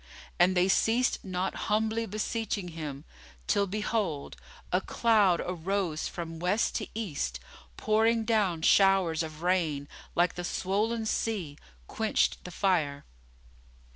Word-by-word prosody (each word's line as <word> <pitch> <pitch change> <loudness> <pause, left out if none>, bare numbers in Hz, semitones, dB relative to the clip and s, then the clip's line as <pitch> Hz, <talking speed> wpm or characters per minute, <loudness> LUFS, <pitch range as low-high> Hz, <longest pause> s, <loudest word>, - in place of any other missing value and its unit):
And 180 +1 +4
they 180 +1 +4
ceased 230 +5 +2
not 185 -1 -2 0.2
humbly 220 +2 +1
beseeching 210 -2 -2
Him 150 -3 -6 0.4
till, 200 -1 +2
behold, 205 -6 -2 0.4
a 180 - +2
cloud 210 -7 +3
arose 180 -2 -2
from 165 -2 -6
West 180 +6 +1
to - - -4
East 150 - -3 0.3
and, - - -30
pouring 225 +1 +2
down 200 -8 +1
showers 190 -5 +4
of 155 0 -6
rain, 165 -6 +1 0.3
like 175 0 +3
the 175 - -5
swollen 215 +6 -1
sea, 200 -9 -2 0.3
quenched - - 0
the - - -5
fire. 165 -7 0
185 Hz, 125 wpm, -29 LUFS, 165-215 Hz, 0.4 s, And